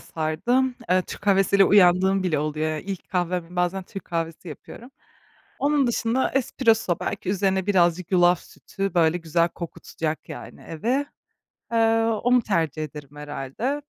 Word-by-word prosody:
sardım. 240 Hz, +12 st, 0 dB, 0.2 s
Eee, 185 Hz, 0 st, +4 dB
Türk -, -, -9 dB
kahvesiyle 195 Hz, -1 st, +4 dB
uyandığım 190 Hz, 0 st, +4 dB
bile 165 Hz, -5 st, 0 dB
oluyor. 155 Hz, +1 st, -1 dB
İlk 195 Hz, -2 st, -6 dB
kahvem, 180 Hz, -1 st, -2 dB
bazen 180 Hz, +2 st, 0 dB
Türk 195 Hz, +1 st, -9 dB
kahvesi 165 Hz, 0 st, -4 dB
yapıyorum. 235 Hz, -, -11 dB, 0.7 s
Onun 285 Hz, -1 st, +2 dB
dışında 235 Hz, +2 st, 0 dB
espresso, 225 Hz, -8 st, +1 dB
belki -, -, -4 dB
üzerine 190 Hz, -1 st, 0 dB
birazcık 180 Hz, -2 st, +2 dB
yulaf 175 Hz, 0 st, +4 dB
sütü, 195 Hz, -1 st, -6 dB
böyle, 165 Hz, 0 st, +3 dB
güzel 170 Hz, 0 st, +1 dB
kokutacak, 160 Hz, -2 st, -5 dB
yani, -, -, -9 dB
evi. 245 Hz, -, -2 dB, 0.7 s
Eee, 225 Hz, 0 st, +3 dB
onu 235 Hz, +2 st, +2 dB
tercih 165 Hz, -7 st, -1 dB
ederim 150 Hz, -1 st, -10 dB
herhâlde. 150 Hz, -, -4 dB
185 Hz, 135 wpm, -24 LUFS, 165-225 Hz, 0.7 s, Eee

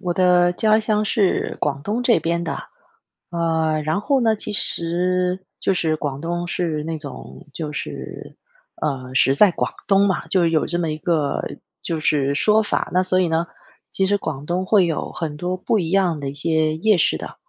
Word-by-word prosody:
我 180 Hz, -2 st, -1 dB
的 180 Hz, 0 st, +4 dB
家 215 Hz, +4 st, +3 dB
乡 215 Hz, -1 st, +1 dB
是 210 Hz, -3 st, +1 dB
广 140 Hz, -1 st, -1 dB
东 215 Hz, +7 st, -2 dB
这 245 Hz, -1 st, +4 dB
边 170 Hz, +1 st, -1 dB
的。 165 Hz, -, -3 dB, 0.7 s
呃， 160 Hz, -2 st, 0 dB
然 155 Hz, +7 st, 0 dB
后 275 Hz, +4 st, +2 dB
呢， 225 Hz, -2 st, +3 dB
其 210 Hz, -, -5 dB
实 180 Hz, 0 st, -1 dB
就 -, -, +1 dB
是 160 Hz, -3 st, 0 dB
广 145 Hz, -3 st, -4 dB
东 175 Hz, +1 st, -3 dB
是 160 Hz, -4 st, -2 dB
那 160 Hz, +1 st, -3 dB
种 145 Hz, 0 st, -10 dB
就 150 Hz, 0 st, -4 dB
是， 150 Hz, -, -7 dB, 0.5 s
呃， 130 Hz, -3 st, -3 dB
食 135 Hz, +1 st, +4 dB
在 200 Hz, +6 st, +6 dB
广 -, -, -2 dB, 0.2 s
东 200 Hz, 0 st, +4 dB
嘛， 190 Hz, -, -1 dB
就 180 Hz, -3 st, +3 dB
有 165 Hz, -1 st, +2 dB
这 175 Hz, -, -1 dB
么 165 Hz, -2 st, -1 dB
一 155 Hz, -, -3 dB
个 155 Hz, -4 st, 0 dB, 0.4 s
就 165 Hz, -2 st, -2 dB
是 140 Hz, -2 st, +1 dB
说 215 Hz, +8 st, +3 dB
法。 -, -, -1 dB
那 185 Hz, +1 st, +3 dB
所 185 Hz, 0 st, +1 dB
以 180 Hz, -, +2 dB
呢， 165 Hz, +1 st, 0 dB, 0.5 s
其 190 Hz, -, +1 dB
实 205 Hz, +1 st, +2 dB
广 145 Hz, -7 st, -5 dB
东 180 Hz, +3 st, -1 dB
会 195 Hz, -2 st, +4 dB
有 165 Hz, -3 st, -2 dB
很 155 Hz, -4 st, -4 dB
多 180 Hz, +3 st, -2 dB
不 185 Hz, +4 st, 0 dB
一 170 Hz, -5 st, -1 dB
样 185 Hz, -5 st, +2 dB
的 140 Hz, -1 st, -3 dB
一 -, -, -7 dB
些 155 Hz, +1 st, +1 dB
夜 210 Hz, +4 st, +3 dB
市 165 Hz, -, +2 dB
的。 -, -, -8 dB
175 Hz, 215 characters per minute, -21 LUFS, 155-190 Hz, 0.7 s, 在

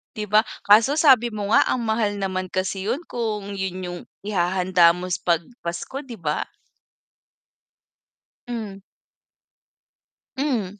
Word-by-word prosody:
'Di 215 Hz, -, -3 dB
ba. 210 Hz, +1 st, +4 dB, 0.2 s
Kaso 225 Hz, +8 st, +5 dB
sabi 260 Hz, -7 st, +5 dB
mo 210 Hz, 0 st, -3 dB
nga -, -, +7 dB
ang 235 Hz, -2 st, 0 dB
mahal 220 Hz, -2 st, 0 dB
naman 185 Hz, -1 st, -3 dB
kasi 190 Hz, +1 st, -2 dB
'yon 270 Hz, +8 st, -1 dB
kung 210 Hz, -6 st, -3 dB
'yon 185 Hz, -1 st, -4 dB
'yong 175 Hz, 0 st, -5 dB, 0.3 s
ihahanda 180 Hz, -3 st, +3 dB
mo 180 Hz, -, -5 dB
s 180 Hz, -1 st, -2 dB
'pag 170 Hz, -1 st, +1 dB, 0.2 s
Pasko, 170 Hz, +11 st, -5 dB
'di 245 Hz, -5 st, -10 dB
ba? 150 Hz, -3 st, -2 dB, 2.0 s
Hmm. 215 Hz, -5 st, -6 dB, 1.6 s
Mhm, 220 Hz, -9 st, -1 dB
200 Hz, 130 wpm, -23 LUFS, 185-230 Hz, 2.0 s, nga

